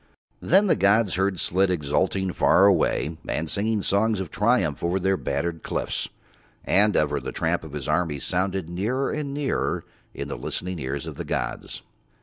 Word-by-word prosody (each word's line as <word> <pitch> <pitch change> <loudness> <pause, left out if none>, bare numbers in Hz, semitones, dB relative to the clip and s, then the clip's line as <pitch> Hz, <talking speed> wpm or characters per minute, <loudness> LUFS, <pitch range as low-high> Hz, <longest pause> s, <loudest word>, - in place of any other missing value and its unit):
Then 195 +5 +4
the 190 - +3
gods 100 +2 +3
heard 95 0 0
Slid 95 +2 +2
exulting 90 +3 0
far 95 - +5
away 80 -4 +2
and 80 +2 -2
singing 105 +4 -1
songs 105 +1 +2
of 95 -4 -5
triumph 105 - +1
over 90 +3 +1
Their 95 +1 +2
battered 85 -3 -2
cliffs, - - -3 0.6
and 105 +1 +4
ever 75 -1 +1
the - - -5
tramp 80 +1 -1
of 80 -3 -10
his 75 -2 -5
armies 75 -3 0
sounded 95 -1 -1
nearer 110 +10 -1
and 150 -2 -3
nearer 145 -1 -1 0.3
in - - -4
the - - -5
listening 90 -1 -4
ears 70 0 -4
of - - -7
the - - -4
gods. - - -4
95 Hz, 170 wpm, -25 LUFS, 80-105 Hz, 0.6 s, far